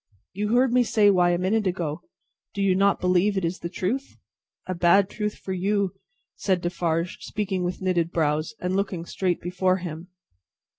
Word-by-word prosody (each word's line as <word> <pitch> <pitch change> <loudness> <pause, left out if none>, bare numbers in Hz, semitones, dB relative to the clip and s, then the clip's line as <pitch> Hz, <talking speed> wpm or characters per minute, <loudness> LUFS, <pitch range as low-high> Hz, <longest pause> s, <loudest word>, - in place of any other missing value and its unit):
"You 210 +4 0
heard 250 0 +3
me 250 - +5
say 210 -3 +4
why, 180 -2 +4
a 175 - +2
minute 200 +3 +1
ago. 170 -3 -2 0.5
Do 200 - 0
you 195 -1 +4
not 200 +2 +3
believe 185 +3 +2
it 190 - 0
is 170 +3 -2
the 170 - -5
truth?" 235 +10 -3 0.5
"A 185 - -3
bad 180 +3 +4
truth 210 -1 -3
for 190 - -6
you," 195 +1 0 0.4
said 190 -3 0
Defarge, 170 0 -1
speaking 195 -3 -3
with 180 +1 -3
knitted 175 -3 +1
brows, 155 -1 0
and 180 +1 -1
looking 190 -4 -2
straight 180 -1 -1
before 185 +1 0
him. 170 -1 -7
185 Hz, 180 wpm, -25 LUFS, 175-200 Hz, 0.5 s, me